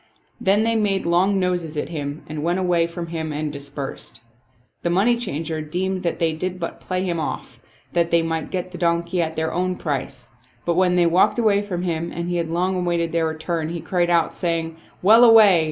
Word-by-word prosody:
Then 200 +3 +3
they 230 0 +1
made 205 -3 +1
long 185 +4 +2
noses 175 -4 -1
at - - -2
him 145 -2 -5
and 155 0 -5
went 170 +3 0
away 175 -3 +2
from 170 0 -6
him 160 -2 -4
and 150 0 -3
dispersed. 140 -1 -6 0.6
The 170 - -1
money 200 +8 +3
changer 160 -8 -3
deemed 185 +5 -2
they 165 -2 0
did 180 +3 -4
but 165 - -5
play 185 0 -2
him 175 -3 -1
off, 155 - -5 0.3
that 170 -1 +2
they 170 -1 +3
might 165 -1 -2
get 185 -1 -4
the 180 - -8
donkey 170 +1 +1
at 160 -1 -2
their 160 0 -2
own 185 +1 0
price; 145 -6 -4 0.3
but, 170 - +2
when 180 0 +3
they 175 -1 +4
walked 175 +7 +3
away 210 -4 +3
from 185 -4 -4
him 170 -1 -2
and 170 +1 -4
he 175 - -1
had 165 -1 -2
long 180 +3 0
awaited 170 -2 0
their 165 -1 +1
return, 160 0 -3
he 170 0 -4
cried 175 0 0
out, 170 -1 +2
saying, 165 -2 -2 0.3
"Well 220 +5 +7
away!" 220 -6 +8
170 Hz, 205 wpm, -22 LUFS, 165-185 Hz, 0.6 s, away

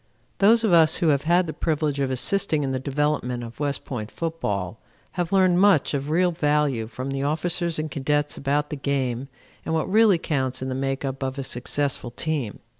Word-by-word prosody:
Those 225 +3 +5
of 210 -5 +2
us 160 -2 +6
who 165 - +2
have 140 0 +1
had 175 +2 +3
the 155 - -5
privilege 150 -3 -1
of 135 -1 0
assisting 150 +5 +1
in 135 - -1
the 130 - -1
development 135 -3 -1
of 115 +1 -10
West 145 -2 -2
Point 110 -5 -5
football 110 - -3 0.3
have 175 -1 -3
learned 185 -2 +4
much 195 -10 +4
of 140 +1 -2
real 175 +3 +2
value 150 -7 0
from 130 +4 -5
the 135 0 -2
officers 170 +3 -1
and 155 -1 -3
cadets 145 +1 -1
about 145 +2 -1
the - - -2
game 135 -2 -2 0.4
and 160 - -2
what 160 - 0
really 210 -1 +5
counts 130 -6 -2
in 130 - -4
the - - -2
make 135 +1 -2
up 135 0 -4
of 130 +1 -3
a 135 - -3
successful 130 +1 -1
team. 135 -2 -3
145 Hz, 200 wpm, -24 LUFS, 130-165 Hz, 0.4 s, us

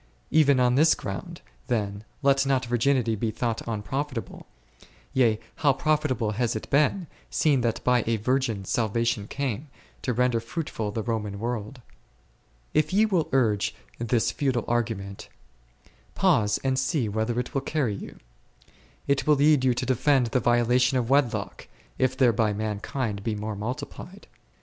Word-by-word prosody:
Even 145 -4 +5
on 125 -1 +3
this 155 +5 +5
ground, 95 -2 -6 0.3
then, 100 -3 -2 0.2
let 135 0 +4
not 135 -2 +1
virginity 120 0 +1
be 110 +1 -1
thought 115 +1 -2
unprofitable; 115 +3 -4 0.7
yea, 115 -5 +3 0.2
how 145 -3 +3
profitable 140 -7 0
has 115 +2 -1
it 110 - -5
been, 150 +6 +2 0.2
seeing 145 -5 +2
that 115 -2 -1
by 125 -2 +3
a 115 - +2
Virgin 115 -3 0
salvation 115 0 0
came, 140 0 -3 0.3
to 125 - -1
render 125 0 +2
fruitful 115 -2 -4
the 110 +1 -3
Roman 105 -3 -3
world. 120 +2 -4 0.9
If 155 0 +2
ye 210 +3 +4
will 185 -7 0
urge 115 -7 +1 0.2
this 120 0 +1
futile 130 -5 -1
argument, 110 -5 -2 0.9
pause 105 -1 +3
and 130 -1 +1
see 130 -2 0
whither 110 +3 -1
it 125 - -4
will 135 - 0
carry 140 -6 -1
you. 100 - -8 0.9
It 140 0 0
will 150 - +6
lead 145 -1 +4
you 125 -2 +3
to - - -2
defend 130 +1 +3
the 125 - +2
violation 120 +3 +3
of 125 0 -1
wedlock, 140 -4 0 0.3
if 130 0 +1
thereby 115 -4 +3
mankind 105 +2 -3
may 105 +2 -3
be - - -6
more 105 0 -4
multiplied. 140 - -6
120 Hz, 150 wpm, -26 LUFS, 110-135 Hz, 0.9 s, will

